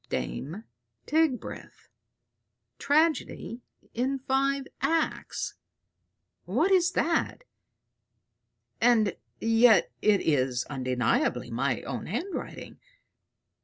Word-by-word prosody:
"DAME 170 +11 -4 0.4
TIGBRITH, 310 -6 -1 0.9
tragedy 295 -5 +1 0.3
in 260 +3 0
five 270 +1 0 0.2
acts." 325 -1 -1 0.9
"What 390 - +1
is 365 -2 +4
that? 335 +8 0 1.4
And 225 -4 +4 0.2
yet 225 -3 +5
it 210 -2 +4
is 130 -5 +1
undeniably 130 - 0
my - - -1
own - - -5
handwriting. 380 0 -5
245 Hz, 75 wpm, -28 LUFS, 205-315 Hz, 1.4 s, yet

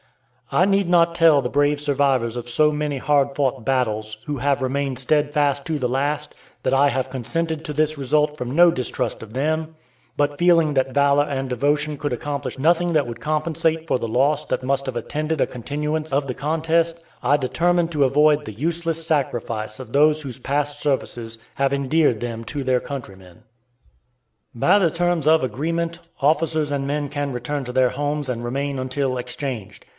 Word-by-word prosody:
I 180 - +4
need 195 -2 +2
not 170 -1 +4
tell 165 -4 +5
the 125 - -2
brave 145 +2 +1
survivors 135 -5 +1
of 120 0 -5
so 150 +5 +3
many 150 -1 -2
hard 140 0 +1
fought 135 -3 0
battles, 110 -4 -1
who 145 -1 -3
have 140 +1 +1
remained 135 0 -1
steadfast 145 0 +1
to 155 -2 -1
the 125 - 0
last, 145 +4 -2 0.3
that 130 - +1
I 140 +1 +5
have 130 -1 -2
consented 160 +5 -3
to - - -5
this 155 +1 0
result 150 +2 +1
from 125 -2 -4
no 175 +3 +7
distrust 125 -6 -2
of 110 - -11
them; 155 +5 -1 0.4
but 145 0 +1
feeling 170 -3 +4
that 130 -1 0
valor 140 0 +4
and 135 -2 -3
devotion 145 +4 0
could 145 0 -3
accomplish 135 0 -4
nothing 170 +4 +3
that 150 -5 +2
would 115 -1 -7
compensate 160 +1 -1
for - - +2
the 115 - -3
loss 140 +6 +2
that - - -2
must 135 +1 0
have 125 -2 -3
attended 155 +6 -2
a - - +2
continuance 150 +5 -3
of 140 +1 0
the 125 - -2
contest, 165 +3 0 0.2
I 145 - +4
determined 170 +5 +1
to 145 -2 +3
avoid 150 +2 +4
the 110 - -7
useless 165 +1 -1
sacrifice 115 -8 -2
of 125 -3 -9
those 150 +2 +4
whose 130 -2 -6
past 145 +2 -1
services 120 -5 -2 0.2
have 135 0 +1
endeared 140 -3 +2
them 115 -1 -4
to 145 +4 -4
their 130 -1 +1
countrymen. 95 -7 -9 1.1
By 120 - +4
the 170 -5 +2
terms 175 -2 0
of 160 -1 +5
agreement, 165 +7 -2 0.2
officers 155 +1 +1
and 140 -1 -1
men 145 0 -1
can 145 0 -3
return 135 +3 -3
to 125 - -5
their 130 0 +3
homes 145 +1 -2
and 120 -2 -3
remain 135 +3 -2
until 130 0 -1
exchanged. 125 -4 -6
145 Hz, 180 wpm, -22 LUFS, 130-155 Hz, 1.1 s, no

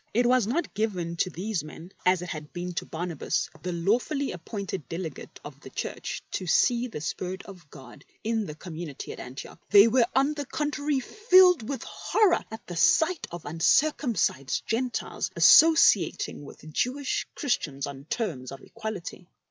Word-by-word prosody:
It 240 +2 +3
was 245 -3 +3
not 305 +8 -1
given 185 -6 -2
to 185 - +1
these 185 0 -3
men 160 +4 -11 0.2
as 180 -1 +3
it 180 - -7
had 150 -2 -7
been 180 0 -4
to - - -4
Barnabas, 165 -2 -2
the 180 - -3
lawfully 240 - 0
appointed 190 -1 -6
delegate 165 -4 -6
of - - -10
the - - -11
Church, - - -5
to 185 - -3
see 240 +8 +3
the 220 - -7
Spirit 185 +4 -4
of 180 -7 -13
God 135 -1 -13 0.2
in 220 -2 -1
the 150 - -7
community 160 -3 -7
at - - -9
Antioch. 130 +2 -9
They 205 +1 +8
were, 235 0 +3
on 275 +3 +3
the 290 -3 -5
contrary, 295 -1 -1
filled 365 - +4
with 275 - -3
horror 420 -5 +1
at 220 0 -9
the 175 - -7
sight 335 - +3
of 175 -1 -8
uncircumcised 165 - +1
Gentiles 245 +2 -2
associating 325 - +5
with 150 - -13
Jew 250 - 0
ish 285 -2 -2
Christians 145 - -1
on 140 -1 -8
terms 160 - -3
of 135 - -8
equality. 215 -5 -7
200 Hz, 165 wpm, -27 LUFS, 165-260 Hz, 0.2 s, They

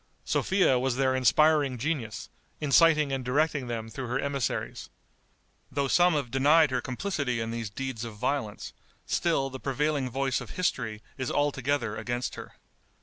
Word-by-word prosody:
Sophia 185 -10 +2
was 130 -1 0
their 130 0 +2
inspiring 145 +1 +3
genius, 120 -5 -3 0.3
inciting 150 0 +4
and 135 -1 -2
directing 145 +1 0
them 115 -2 -4
through 120 +3 -6
her 120 - -1
emissaries. 140 -5 -3 0.8
Though 140 +1 0
some 175 +4 +4
have 140 -5 -2
denied 145 +3 +4
her 125 -1 0
complicity 130 -3 -2
in 115 0 -3
these 115 -2 -4
deeds 130 +1 -5
of 115 -2 -7
violence, 110 -1 -3 0.3
still 135 -6 0
the 130 - -7
prevailing 140 0 -1
voice 135 +1 -1
of - - -9
history 110 -11 -1 0.2
is 130 - -2
altogether 140 -5 0
against 120 0 -3
her. - - -9
135 Hz, 150 wpm, -28 LUFS, 120-145 Hz, 0.8 s, inciting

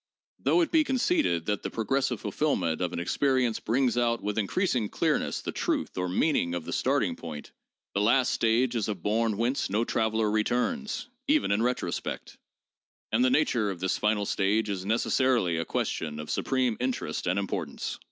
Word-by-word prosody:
Though 355 - +3
it 325 - 0
be 320 -2 +5
con 265 -3 -1
ceded 85 - +1
that 105 -1 -1
the - - -4
progressive 135 +4 -1
fulfillment 95 - -1
of 90 - 0
an - - -4
experience 125 +5 +1
brings 125 +1 +1
out 115 -1 +1
with 105 +1 -1
increasing 120 - 0
clearness - - 0
the - - -4
truth - - -2
or 90 0 -1
meaning 90 - +1
of 85 - -4
the - - -4
starting - - +1
point, 80 -3 -8 0.4
the 100 - +1
last 120 +4 +3
stage 120 +2 +2
is 110 -2 -1
a 105 - -1
bourne 105 +4 0
whence 120 +5 0
no 105 +4 +1
traveler, 110 -1 +1
returns, 125 - -1 0.2
even 300 +1 +3
in 100 +2 +2
retro 125 +2 0
spect. - - -5 0.7
And 115 +3 +3
the 130 - +4
nature 125 -6 +2
of 95 -3 -5
this 95 +1 -1
final 105 -1 +1
stage 105 +3 +1
is 95 -1 -3
necessarily 115 -5 +2
a 80 - -1
question 75 -2 -2
of 75 - -5
supreme 130 -4 0
interest 125 -6 -2
and 90 +2 +1
importance. 100 -1 -3
110 Hz, 180 wpm, -28 LUFS, 100-130 Hz, 0.7 s, be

